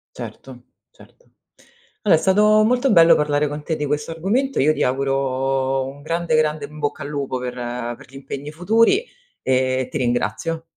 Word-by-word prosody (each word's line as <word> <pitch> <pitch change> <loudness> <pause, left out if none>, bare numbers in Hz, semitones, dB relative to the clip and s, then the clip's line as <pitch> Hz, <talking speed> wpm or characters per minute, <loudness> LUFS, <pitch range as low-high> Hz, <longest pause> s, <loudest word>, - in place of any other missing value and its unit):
Certo, - - -10 0.3
certo. - - -21 0.7
Alo 195 -6 +5
è - - +3
stato 210 +4 +4
molto 250 +3 +2
bello 165 -3 +7
parlare 150 0 +1
con 150 +1 -6
te 160 - -2
di 150 - -2
questo 150 +2 -2
argomento. 215 +12 -1
Io 155 +3 +4
ti - - -1
auguro 135 0 0
un 140 +2 -9
grande, 165 +2 -1
grande 155 0 +1
in 150 0 -12
bocca 145 -1 -3
al - - -6
lupo 140 -3 -3
per 125 -1 -4 0.4
per - - -15
gli 135 - -16
impegni 140 +1 -7
futuri 225 - +2 0.4
e 130 0 +1
ti 140 - -3
ringrazio. 125 +6 -1
150 Hz, 175 wpm, -21 LUFS, 135-170 Hz, 0.7 s, bello